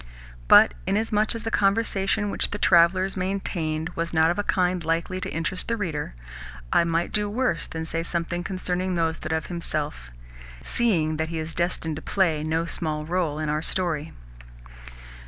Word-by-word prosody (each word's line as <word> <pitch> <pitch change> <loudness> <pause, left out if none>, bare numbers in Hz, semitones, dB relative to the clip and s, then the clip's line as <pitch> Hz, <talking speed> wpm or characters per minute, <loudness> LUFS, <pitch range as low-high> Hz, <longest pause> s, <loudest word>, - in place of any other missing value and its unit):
But - - +8
inasmuch 215 +1 +1
as 230 - -5
the 225 - -3
conversation 200 0 +1
which - - -1
the 205 - -4
travellers 185 +1 +4
maintained 175 -4 -2
was 170 -1 -4
not 160 +1 +5
of 175 - -2
a - - +1
kind 180 -3 +1
likely 165 +3 -1
to 185 - -3
interest 175 +3 -3
the 230 - 0
reader, 155 - -3 0.6
I - - +5
might 165 +1 0
do 210 -1 0
worse 250 +5 0
than 160 0 -5
say 165 +1 -2
something 170 +1 -2
concerning 185 0 -2
Nozdrev 160 -1 -1
himself, 155 - -3 0.5
seeing 165 -10 +1
that 160 +1 -1
he 165 - -4
is 160 +1 -4
destined 170 -3 -1
to - - -6
play 165 -6 +1
no 160 +1 0
small 155 -3 -2
role 165 -3 -1
in 155 0 -2
our 150 +1 0
story. 165 -3 -1
170 Hz, 165 wpm, -25 LUFS, 160-190 Hz, 0.6 s, But